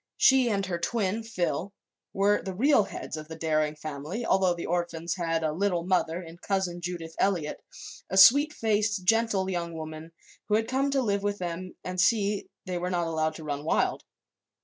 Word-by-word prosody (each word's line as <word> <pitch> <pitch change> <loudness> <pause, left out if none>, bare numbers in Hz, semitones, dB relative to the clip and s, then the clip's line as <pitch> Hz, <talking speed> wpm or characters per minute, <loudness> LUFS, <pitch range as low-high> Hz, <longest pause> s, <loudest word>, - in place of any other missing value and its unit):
She 260 -2 +5
and 200 -2 0
her 175 -2 -3
twin, 210 +2 -1
Phil, 200 -3 -2 0.4
were 200 +1 +2
the 190 -1 -6
real 250 0 +4
heads 160 - -6
of 155 0 -8
the 160 - -8
Daring 155 -1 0
family, 155 +9 -5
although 190 -2 +3
the 170 - -5
orphans 170 -1 -2
had 165 -2 -1
a 155 - +1
"Little 180 0 0
Mother" 180 -1 0
in 165 0 -11
Cousin 190 -3 -2
Judith 170 -2 -5
Eliot, 175 -6 0 0.5
a 190 - -1
sweet 285 +10 +8
faced, 215 -6 0
gentle 225 -2 +2
young 170 -3 -3
woman 155 +1 -7 0.4
who 210 - +2
had 225 +1 +1
come 270 +2 +1
to 275 -1 +1
live 200 -3 0
with 205 0 -1
them 180 0 -5
and 185 0 -1
see 205 0 +3
that 200 - -8 0.2
they 180 -2 -3
were 180 +1 -2
not 175 -2 0
allowed 160 -1 -1
to 160 - -9
run 145 -1 -4
wild. 160 - 0
185 Hz, 195 wpm, -28 LUFS, 165-205 Hz, 0.5 s, sweet